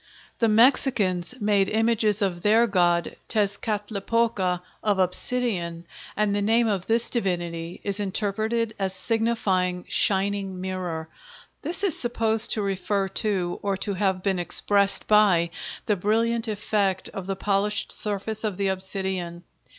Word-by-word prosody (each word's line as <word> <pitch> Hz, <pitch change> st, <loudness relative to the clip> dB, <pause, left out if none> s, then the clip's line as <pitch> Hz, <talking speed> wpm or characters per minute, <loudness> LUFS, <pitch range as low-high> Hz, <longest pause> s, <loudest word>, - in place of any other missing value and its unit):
] -, -, -28 dB
The 230 Hz, -, +3 dB
Mexicans 215 Hz, -5 st, +2 dB
made 205 Hz, -2 st, +2 dB
images 220 Hz, -2 st, +2 dB
of 175 Hz, -3 st, -1 dB
their 220 Hz, +4 st, +4 dB
god 175 Hz, -5 st, +1 dB
Tezcatlipoca 205 Hz, -2 st, 0 dB, 0.2 s
of 205 Hz, -2 st, +1 dB
obsidian, 180 Hz, -3 st, -1 dB, 0.3 s
and 210 Hz, -1 st, +1 dB
the 205 Hz, -, 0 dB
name 225 Hz, +3 st, +2 dB
of 195 Hz, -4 st, -2 dB
this 230 Hz, +1 st, +1 dB
divinity 175 Hz, -6 st, -2 dB
is 200 Hz, 0 st, +1 dB
interpreted 215 Hz, +3 st, -1 dB
as 190 Hz, -1 st, -2 dB
signifying 190 Hz, -4 st, -1 dB
"shining 195 Hz, -1 st, 0 dB
mirror." 180 Hz, -4 st, -4 dB, 0.5 s
This 355 Hz, +3 st, -2 dB
is 385 Hz, -6 st, +2 dB
supposed 225 Hz, -1 st, +2 dB
to 215 Hz, -, -1 dB
refer 195 Hz, 0 st, -1 dB
to, 190 Hz, -3 st, -1 dB
or 200 Hz, -1 st, -1 dB
to 200 Hz, +1 st, -2 dB
have 190 Hz, -1 st, -1 dB
been 195 Hz, -2 st, 0 dB
expressed 200 Hz, +3 st, +3 dB
by, 190 Hz, -6 st, +4 dB, 0.3 s
the 210 Hz, -, +1 dB
brilliant 225 Hz, +4 st, 0 dB
effect 205 Hz, -3 st, -1 dB
of 195 Hz, -3 st, -7 dB
the 195 Hz, -, -2 dB
polished 205 Hz, +2 st, 0 dB
surface 210 Hz, +1 st, -2 dB
of 210 Hz, -4 st, -2 dB
the 200 Hz, -1 st, 0 dB
obsidian. 190 Hz, -2 st, -4 dB
200 Hz, 135 wpm, -24 LUFS, 185-220 Hz, 0.5 s, their